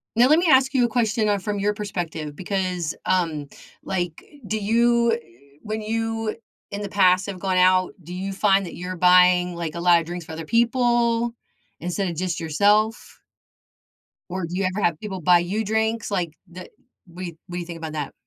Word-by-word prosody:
Now, 240 +2 +6
let 305 +4 +5
me 350 - +1
ask 265 -1 +5
you 250 -3 +3
a - - -1
question, 220 -2 +1
uh, 205 - +2
from 205 +1 -3
your 205 +1 +1
perspective 170 -8 -5
because, 180 -3 -2
um, 165 -6 0 0.4
like, 175 -4 -3 0.2
do 220 - -1
you 235 +2 +3
eh 230 - -1 0.4
when 215 0 -4
you 225 0 -2 0.4
in 200 - -4
the 205 - -3
past, 185 -1 +3
have 195 -3 -6
gone 185 0 0
out, 185 0 +4
do 175 - -9
you 190 +2 -4
find 195 0 +2
that 175 - -8
you're 180 +1 -5
buying, 180 0 +5
like, 170 -2 -4
a 170 - -5
lotta 170 -1 +4
drinks 175 +1 -6
for 160 - -9
other 160 0 -6
people 235 - +2 0.5
instead 180 +3 -2
of 170 - -4
just 180 0 -2
yourself 205 +8 +1 1.1
Or, 185 -1 -3
do 170 +2 -6
you 195 - 0
ever 185 +3 -2
have 170 -2 0
people 190 -4 -6
buy 175 +1 +5
you 200 +6 -2
drinks? 220 +1 0
Like, 175 -5 -2
the 180 +1 -10 0.4
what 180 +2 -8 0.2
what 175 - -7
do - - -2
you 175 - -5
think 170 -1 -7
about 160 -1 -6
that? 150 -2 -4
190 Hz, 195 wpm, -23 LUFS, 175-220 Hz, 1.1 s, Now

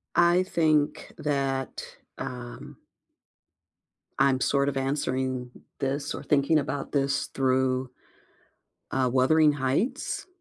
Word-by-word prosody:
I 175 +1 +5
think 155 -5 +1
that, 135 -2 -2 0.3
um 120 -1 -7 1.4
I'm 135 -1 +3
sort 140 0 +2
of 135 - -4
answering 130 -2 -1 0.3
this 140 +2 -2
or - - -6
thinking 150 +2 +3
about 140 0 -4
this 140 -1 0
through, 130 -1 +1 1.0
uh, 130 -1 +1
Wuthering 150 +4 +4
Heights. 145 - -1
135 Hz, 100 wpm, -27 LUFS, 130-150 Hz, 1.4 s, I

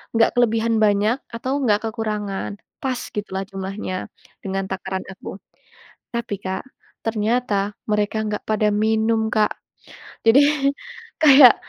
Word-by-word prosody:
nggak 225 0 +5
kelebihan 230 -1 +2
banyak 210 +3 +3 0.2
atau 260 +4 -1
enggak 215 -2 +2
kekurangan. 210 -3 -3 0.3
Pas 255 -2 -1 0.2
gitulah 195 -2 -3
jumlahnya 190 -1 -4 0.4
dengan 195 0 -2
takaran 190 0 -3
aku. 190 0 -8 0.8
Tapi 235 -3 -2
Kak, 190 0 -3 0.4
ternyata 215 -2 0 0.2
mereka 210 +1 +1
nggak 210 -1 -3
pada 215 0 +2
minum 220 +1 +2
Kak. 215 -2 +3 0.7
Jadi 225 +4 +7 0.8
kayak, 270 -4 +9
215 Hz, 115 wpm, -22 LUFS, 200-230 Hz, 0.8 s, kayak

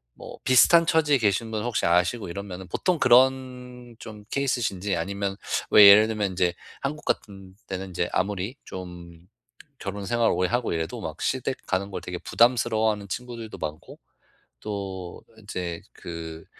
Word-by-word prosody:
뭐 - - -10
비슷한 165 +6 +6
처지에 150 -4 +3
계신 110 +1 0
분 110 -1 -2
혹시 120 -2 -1
아시고 90 +6 +2
이러면은 95 -1 -7
보통 175 - 0
그런 125 -1 +2
좀 105 -2 -10
케이스이신지 115 -8 -1
아니면 100 +3 -3 0.3
왜 105 -1 +10
예를 105 +2 +8
들면 105 -3 -1
인제 90 -1 +1 0.3
한국 150 +2 -4
같은 95 -2 -4
때는 95 0 -5
인제 85 -1 -2
아무리 100 +5 -2
좀 90 -2 -9 0.6
결혼 100 0 -5
생활 120 +1 +2
오래하고 115 +4 0
이래도 80 0 -3
막 - - -6
시댁 - - -1
가는 95 +2 -1
걸 - - -5
되게 90 -1 -6
부담스러워하는 110 -1 +2
친구들도 115 0 -6
많고 75 +1 -7 0.6
또 95 -4 -6 0.2
인제 90 -5 -5
그 80 -1 -8
100 Hz, 320 characters per minute, -25 LUFS, 90-120 Hz, 0.6 s, 왜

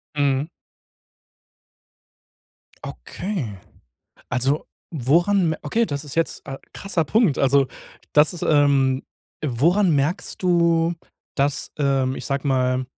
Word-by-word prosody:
Mhm. 140 0 +1 2.4
Okay. 125 - -5 0.7
Also 135 +4 0 0.3
woran 170 +6 +2
me 160 - -2
okay, 225 +10 0
das 145 -5 -4
ist 145 - -7
jetzt 165 -1 -1
äh, 135 0 -5 0.2
krasser 190 -5 -1
Punkt. 215 - +2
Also 135 0 +3 0.5
das 150 +4 +5
ist, 175 - -6
ähm 140 -3 +3 0.4
woran 170 - +2
merkst 145 +6 -1
du, 170 -2 +2 0.4
dass 140 +1 -1
ähm, 135 -2 +1
ich - - -7
sage 140 +1 -2
mal 130 -1 +1
145 Hz, 110 wpm, -22 LUFS, 135-170 Hz, 2.4 s, das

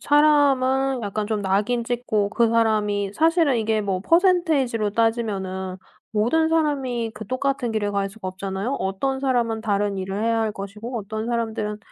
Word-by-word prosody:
사람은 270 -3 +3
약간 210 0 -2
좀 215 -1 -1
낙인찍고 215 +1 0
그 230 +2 +2
사람이 210 -3 +1
사실은 320 - +3
이게 220 -1 0
뭐 195 -3 -2
퍼센티지로 315 - +2
따지면은 200 -5 -1 0.3
모든 240 +10 +2
사람이 275 -8 0
그 220 - -8
똑같은 255 -1 -1
길을 205 -2 -1
갈 200 -1 0
수가 195 -2 -7
없잖아요. 195 +5 -4
어떤 265 +8 -1
사람은 240 -4 0
다른 205 -2 0
일을 195 +2 -3
해야 230 0 +1
할 220 -1 0
것이고 210 +5 -7
어떤 215 +1 -5
사람들은 220 -3 -2
225 Hz, 340 characters per minute, -23 LUFS, 205-260 Hz, 0.3 s, 사람은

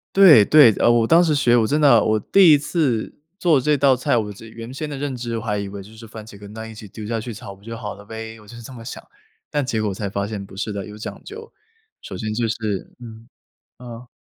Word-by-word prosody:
对， 165 - +8
对， 145 -4 +7
呃， - - +3
我 115 -1 +2
当 170 +5 +5
时 160 -3 +1
学， 120 -4 +3
我 115 - +3
真 150 +6 0
的， 130 -6 +6
我 110 -1 +1
第 180 -6 +8
次 145 -6 -1 0.3
做 165 -8 +3
这 150 +3 +1
道 135 -1 +3
菜， 125 -1 0
我 105 -3 -1
这 105 +3 -12
原 115 +2 -10
先 150 +3 -5
的 145 - -6
认 140 -1 -4
知， 120 -1 -5
我 110 - -9
还 105 -2 -2
以 100 0 -4
为 100 0 -8
就 100 - -14
是 115 +1 -12
番 110 0 -10
茄 105 -2 -13
跟 105 +1 -12
蛋 110 0 -8
一 110 - -11
起 105 -1 -11
丢 105 +2 -10
下 115 0 -2
去 115 +1 -7
炒 100 -1 -10
不 100 - -24
就 115 +1 -7
好 105 -2 -6
了 100 0 -15
呗， 110 +1 -8
我 105 - -18
就 120 - -12
是 120 - -10
这 115 - -11
么 115 -2 -11
想， - - -8 0.5
但 145 -3 -1
结 110 -4 -2
果 105 - -1
才 100 +2 -4
发 100 +1 -3
现 105 -2 -6
不 95 - -15
是 105 +2 -4
的， 100 -2 -5
有 105 - -11
讲 105 - -8
究， 450 +3 -11 0.5
首 - - -8
先 110 -1 -4
就 115 0 0
是 105 -5 -4
嗯， 115 -1 -12 0.5
嗯。 120 0 -10
115 Hz, 290 characters per minute, -21 LUFS, 105-130 Hz, 0.5 s, 对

